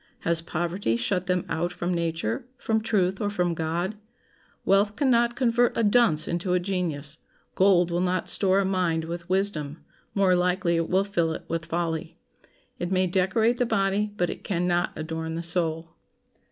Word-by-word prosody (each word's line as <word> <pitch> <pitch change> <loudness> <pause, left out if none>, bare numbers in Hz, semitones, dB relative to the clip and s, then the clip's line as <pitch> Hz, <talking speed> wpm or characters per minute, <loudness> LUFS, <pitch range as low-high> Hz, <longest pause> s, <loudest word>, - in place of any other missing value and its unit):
Has 165 0 +1
poverty 170 - -1
shut 180 +10 -1
them 180 -1 0
out 170 +2 -1
from 180 0 -2
nature, 170 +9 -2
from 220 -1 0
truth, 195 -3 0
or 205 - 0
from 180 -4 0
God? 170 +6 -2 0.7
Wealth 200 +2 +3
can 280 -3 +2
not 235 0 +3
convert 245 -1 +2
a 230 - +2
dunce 205 -8 +3
into 175 +1 -1
a 180 - +3
genius. 165 -6 -2 0.3
Gold 180 -2 +4
will 175 +1 0
not 185 0 0
store 190 -1 +4
a 200 - +2
mind 180 -4 0
with 170 +1 -6
wisdom; 175 -6 -1 0.3
more 195 -2 +4
likely 180 -1 +1
it 165 0 -1
will 190 +2 +3
fill 170 -5 0
it - - -8
with 165 0 -3
folly. 165 0 -3 0.6
It 175 - -2
may 185 0 +2
decorate 190 +6 +1
the 245 - +1
body, 200 0 +1
but 175 - 0
it - - -9
can 180 -3 -1
not 175 0 +1
adorn 160 +1 -4
the 170 - -4
soul. 165 -1 -1
180 Hz, 180 wpm, -26 LUFS, 165-195 Hz, 0.7 s, Gold